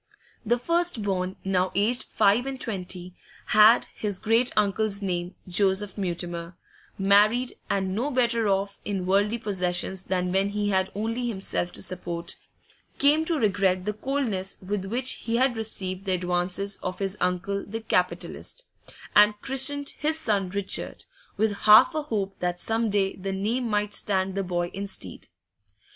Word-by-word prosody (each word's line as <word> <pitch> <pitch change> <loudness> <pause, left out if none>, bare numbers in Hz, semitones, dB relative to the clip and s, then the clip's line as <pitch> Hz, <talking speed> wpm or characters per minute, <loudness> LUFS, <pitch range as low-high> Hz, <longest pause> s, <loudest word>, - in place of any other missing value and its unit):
The 240 +2 +2
first 335 -2 0
born, 185 -2 -1
now 185 -1 +1
aged 230 +6 +2
five 220 +6 +2
and 270 -1 -4
twenty, 185 -5 -4 0.4
had 215 +2 +7
his 205 -3 -2
great 225 +5 +2
uncle's 205 0 +1
name; 175 -1 -2
Joseph 190 +2 +1
Mutimer, 175 -2 -4 0.4
married, 210 +5 +4 0.2
and 190 -1 0
no 240 +8 -1
better 235 -4 +1
off 200 +1 -1
in 195 -3 -3
worldly 205 +4 +2
possessions 190 -3 -1
than 180 -1 -1
when 195 +2 +2
he 205 0 -1
had 190 -1 +1
only 230 +4 -2
himself 190 -4 -2
to - - -4
support, 175 -2 -5 0.6
came 300 +3 +4
to 330 -1 0
regret 190 -5 +1
the 210 - -1
coldness 215 -5 -2
with 195 0 -3
which 250 +6 -1
he 230 - 0
had 255 0 +2
received 195 -4 -3
the 190 - 0
advances 180 +2 -1
of 185 0 -5
his 195 0 -2
uncle 180 +2 -1
the 225 +3 -6
capitalist, 220 - -2 0.5
and 210 0 +6
christened 275 +1 +1
his 310 +1 +1
son 205 -11 0
Richard, 200 +1 -2 0.3
with 215 0 +1
half 215 +10 +9
a 310 - -1
hope 205 -9 -3
that 180 0 -2
some 225 +2 0
day 195 -1 +1
the 195 +1 -4
name 225 +6 -1
might 210 -1 0
stand 190 -1 0
the 195 - -1
boy 175 -2 -2
in 200 +1 -4
stead. 190 - -6
200 Hz, 155 wpm, -26 LUFS, 185-225 Hz, 0.6 s, half